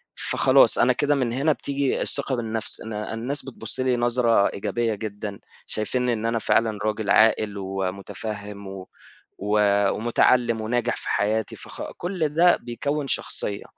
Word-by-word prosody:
فخلاص - - +4
أنا 125 - +4
كده 145 +3 +1
من 125 -4 0
هنا 145 +5 +2
بتيجي 140 -1 -1
الثقة 140 -2 -1
بالنفْس 115 -2 -2
إن 110 - -6
الناس 115 +6 -3
بتبُصّ 120 -4 -4
لي 130 -1 +2
نظرة 120 -3 +3
إيجابية 110 +3 -1
جدًا، 105 -1 -6 0.3
شايفينني 125 +3 0
إن 110 -1 -3
أنا 115 0 +1
فعلًا 110 -1 +1
راجل 110 0 -2
عاقل 110 -1 +4
ومتفهم 100 +2 -5
و 95 -1 -8 0.5
و 105 +2 0 0.3
ومتعلّم 120 +1 +2
وناجح 120 +2 0
في - - -9
حياتي 110 +1 0
فخ - - -9
كلّ 175 -3 -1
ده 170 +4 +5
بيكوّن 140 +5 -3
شخصية، 100 -5 -2
115 Hz, 145 wpm, -24 LUFS, 105-125 Hz, 0.5 s, ده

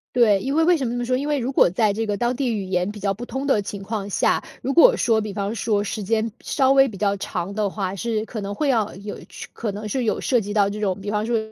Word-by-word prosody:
对， 220 -5 +5
因 270 +9 -2
为 325 - +4
为 350 +1 +4
什 270 - -2
么 235 - -2
这 - - -2
么 245 - -2
说？ 255 +1 +1
因 280 +3 -3
为 295 -1 +1
如 255 +1 -2
果 265 - +5
在 210 +4 +2
这 220 +2 -2
个 205 - -1
当 240 +4 0
地 275 - 0
语 215 -4 -1
言 185 0 -1
比 210 0 -8
较 195 0 +1
不 235 +5 -7
通 265 +2 -4
的 245 -7 +2
情 200 0 -6
况 205 -1 -4
下， - - +2 0.2
如 270 - -1
果 - - +7
说 225 - +2
比 210 -2 -4
方 200 +1 -2
说 215 -2 0
时 210 +1 -4
间 225 +1 0
稍 270 -3 +1
微 270 0 +6
比 205 - -8
较 200 0 +1
长 190 0 -4
的 210 -1 0
话， 195 -1 -3
是 225 0 -1
可 225 - -6
能 200 0 -4
会 295 +3 0
要 220 -7 +1
有 200 +2 -7
是 - - -8
可 215 -3 -4
能 210 +1 -6
是 250 +2 -1
有 - - 0
涉 250 - +2
及 205 -1 -5
到 205 -2 +3
这 210 +1 -5
种， 195 -3 0
比 205 +1 -4
方 210 0 0
说 230 0 +1
215 Hz, 325 characters per minute, -23 LUFS, 200-245 Hz, 0.2 s, 果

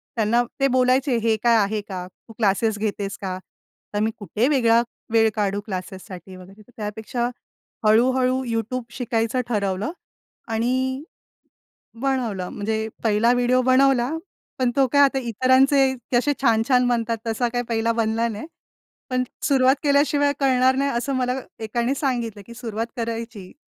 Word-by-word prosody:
त्यांना 230 +2 +2 0.2
ते 275 - +4
बोलायचे, 255 +1 +2
"हे 225 -1 +2
काय 235 -1 +5
आहे 210 +1 +1
का? 185 -3 -6
तू 225 +4 -18
क्लासेस 215 0 +1
घेतेस 205 -2 -3
का?" 185 -1 -3 0.6
तर 205 - 0
मी 220 +1 +1
कुठे 210 +5 0
वेगळा 235 -5 +4 0.3
वेळ 225 -1 +5
काढू 205 -1 0
क्लासेससाठी 185 -1 -7
वगैरे, 190 +3 -14
तर 230 - -20
त्यापेक्षा 220 +3 -3 0.6
हळू-हळू 255 +3 +3
YouTube 230 +2 -2
शिकायचं 235 0 0
ठरवलं 200 - -1 0.6
आणि 260 +4 0 1.0
बनवलं. 235 -9 -1
म्हणजे 220 +1 -2 0.2
पहिला 225 +2 +3
व्हिडिओ 250 +1 +2
बनवला, 260 -1 +3 0.5
पण 250 -1 +2
तो 270 -2 +4
काय 285 - +6
आता 270 -1 +3
इतरांचे 260 +3 +3 0.2
कसे 290 +4 +2
छान-छान 250 +1 +3
बनतात 230 -1 0
तसा 230 +2 0
काही 245 0 0
पहिला 230 0 +1
बनला 225 +1 0
नाही, 220 +4 -5 0.7
पण 255 0 +1 0.2
सुरुवात 265 0 +4
केल्याशिवाय 285 0 +3
कळणार 260 -1 +3
नाही 280 +1 +1
असं 270 +3 -2
मला 255 +1 -1 0.2
एकाने 235 +4 -1
सांगितलं 235 -7 -2
की 235 - -11
सुरुवात 230 -1 -4
करायची. 230 -4 -5
235 Hz, 140 wpm, -23 LUFS, 215-260 Hz, 1.0 s, काय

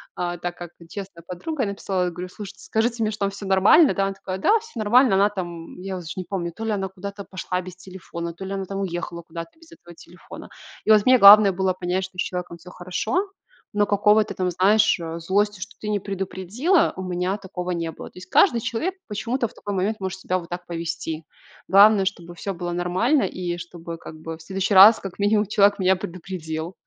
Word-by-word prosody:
а, 175 0 -3
так 175 0 -5
как 175 -1 -8 0.2
честная 195 -3 -8
подруга. 255 - -3
Я 205 - -1
написала, 195 -2 -2
я 180 - -2
говорю: 180 +2 -7
"Слушайте, 200 +1 -10
скажите 230 +1 0
мне, 215 - 0
что 210 - -8
там - - 0
всё 200 +1 -9
нормально, 200 - +5
да?" 195 - 0
Она 195 - -2
такая: 190 -1 -6
"Да, 425 - +4
всё 460 +1 -15
нормально". 225 +1 +4
Она 200 +2 +4
там- 175 -4 -7
я 190 0 -4
уже 175 -3 -9
не 185 - -4
помню- 175 -1 -4
то 225 - -6
ли 225 - -1
она 195 -2 -1
куда-то 200 +1 -8
пошла 180 0 -4
без 180 0 -10
телефона, 180 -2 -8
то 190 +3 -8
ли 195 - -5
она 195 -1 -3
там 195 +1 -5
уехала 175 -2 -4
куда-то 165 - -9
без 330 0 -19
этого 175 - -15
телефона. 175 - -13 0.4
И 220 - +4
вот 210 -1 +6
мне 255 0 +6
главное 200 0 +9
было 190 0 0
понять, 185 +1 -2
что 185 -1 -15
с - - 0
человеком 180 -1 -4
всё 175 +2 -14
хорошо, 185 - -2 0.4
но 205 -1 +2
какого-то 210 +1 +3
там, 185 -1 -1
знаешь, 200 +3 +3
э, 165 0 -5
злости, 205 +4 0
что - - -8
ты 210 - -5
не 210 -1 0
предупредила, 195 - 0
у 190 - -6
меня 180 +2 -2
такого 180 -2 -6
не 165 -2 -2
было. - - -10
То - - -21
есть 180 - -10
каждый 235 - +4
человек 330 +14 -2
почему-то 235 +4 -2
в - - -19
такой 205 -1 -5
момент 200 +3 -1
может 190 0 -4
себя 185 0 -1
вот 170 - -12
так 175 0 -6
повести. 165 -1 -4 0.4
Главное, 200 +1 +6
чтобы 175 -3 -4
всё 190 +3 -5
было 175 0 -4
нормально, 185 - +1
и 175 -1 -3
чтобы 170 -1 -8
как 165 - -10
бы 160 0 -7
в - - -16
следующий 195 +4 -2
раз, 200 +4 +9
как 195 -1 -8
минимум, 210 +1 +2
человек 205 0 +3
меня 190 0 +3
предупредил. 170 -2 -6
190 Hz, 225 wpm, -23 LUFS, 175-205 Hz, 0.4 s, главное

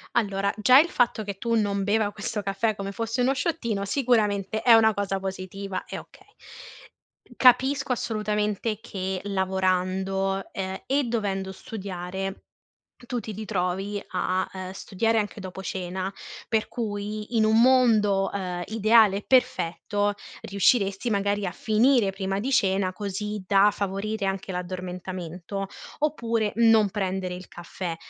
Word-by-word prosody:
Allora, 200 -3 +1
già 250 +6 +7
il 335 - +3
fatto 240 -5 +1
che 200 -1 -5
tu 230 +2 0
non 200 -2 0
beva 205 +1 +1
questo 210 +1 -4
caffè 200 +3 0
come 195 0 -5
fosse 230 +4 -2
uno 260 +2 +3
shottino 235 - -1
sicuramente 215 -3 +1
è 240 - +6
una 220 -1 +6
cosa 195 -1 -2
positiva 190 0 -5
e - - -6
okay. 395 - -17 1.1
Capisco 260 +1 +4
assolutamente 210 -2 -1
che 190 -4 -4
lavorando, 190 0 0
ehm, 190 0 -4
e 280 +1 +2
dovendo 200 -5 -2
studiare, 190 -1 -6 0.6
tu 245 - -2
ti 220 - -7
ritrovi 200 -1 -2
a, 185 0 0
ehm, 185 -1 -6
studiare 225 +4 0
anche 210 0 -4
dopo 190 0 -7
cena, 185 +1 -3 0.4
per 220 -1 +1
cui, 210 0 -4
in 220 - +4
un 220 +1 +4
mondo, 220 -6 +4
ehm, 180 -3 -3
ideale 220 -2 +4
e 205 - -6
perfetto, 205 -4 +1 0.3
riusciresti 200 +2 +2
magari 200 0 0
a 180 - -2
finire 225 +1 +3
prima 195 0 -2
di 255 +6 -2
cena, 190 -5 +2
così 210 0 -4
da 200 0 +5
favorire 200 +2 -3
anche 195 0 -2
l'addormentamento 180 +1 -5 0.3
oppure 230 -8 0
non 225 -3 +5
prendere 190 -2 -2
il 180 0 -10
caffè. 175 0 -6
200 Hz, 135 wpm, -26 LUFS, 190-220 Hz, 1.1 s, già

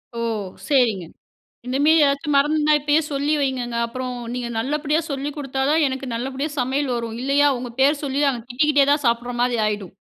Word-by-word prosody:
ஓ! 235 - -4 0.5
சரிங்க 230 - +2 0.6
இந்த 255 +1 -1
மாரி 315 0 +5
ஏதாச்சும் 280 +1 0
மறந்துனா 300 +2 +3
இப்பயே 295 +2 +2
சொல்லி 285 +2 0
வைங்கங்க. 250 -3 -2
அப்புறம் 255 +1 -5 0.2
நீங்க 245 -1 -3
நல்லபடியா 295 +5 0
சொல்லிக் 280 +1 -4
குடுத்தா 270 -2 -3
தான் 310 0 +3
எனக்கு 265 0 -4
நல்லபடியா 265 +5 -3
சமையல் 260 +1 0
வரும். 230 -1 -4
இல்லையா? 280 +2 +3
உங்க 245 -1 -6
பேர 275 +2 +5
சொல்லி 275 0 -1
நாங்க 250 -4 -1
திட்டிக்கிட்டே 285 +2 +3
தான் 290 0 +1
சாப்பிடுற 240 +1 0
மாரி 245 -1 +1
ஆயிடும். 205 -4 -3
270 Hz, 175 wpm, -22 LUFS, 245-290 Hz, 0.6 s, மாரி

